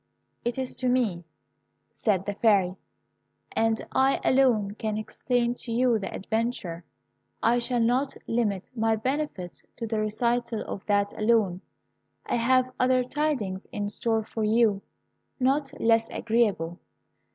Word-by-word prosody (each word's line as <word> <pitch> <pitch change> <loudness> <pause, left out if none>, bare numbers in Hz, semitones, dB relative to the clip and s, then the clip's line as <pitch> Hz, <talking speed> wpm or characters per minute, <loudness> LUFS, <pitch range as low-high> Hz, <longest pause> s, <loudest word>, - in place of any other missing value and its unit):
"It 240 +1 -2
is 260 -1 -2
to 255 - 0
me," 220 -9 +1 0.7
said 195 -4 0
the 205 - -2
Fairy; 195 -4 +3 0.8
"and 225 0 +1
I 265 +1 +3
alone 240 -7 +3
can 215 0 -3
explain 240 +2 0
to 245 -1 -7
you 240 -1 +3
the 195 - -5
adventure. 210 -5 -2 0.6
I 235 +2 +4
shall 245 0 0
not 250 +4 +1
limit 210 -5 -1
my 225 -1 +2
benefits 255 - -3
to 230 - -4
the 220 -1 -1
recital 235 +2 0
of 195 - -6
that 205 -1 +2
alone. 210 -5 +2 0.6
I - - 0
have 255 +2 +3
other 255 0 +3
tidings 250 -9 -2
in 205 0 -2
store 225 +1 0
for 220 +1 -4
you, 215 -2 +3 0.6
not 270 +2 +1
less 225 0 +3
agreeable. 205 -7 0
225 Hz, 135 wpm, -27 LUFS, 205-245 Hz, 0.8 s, I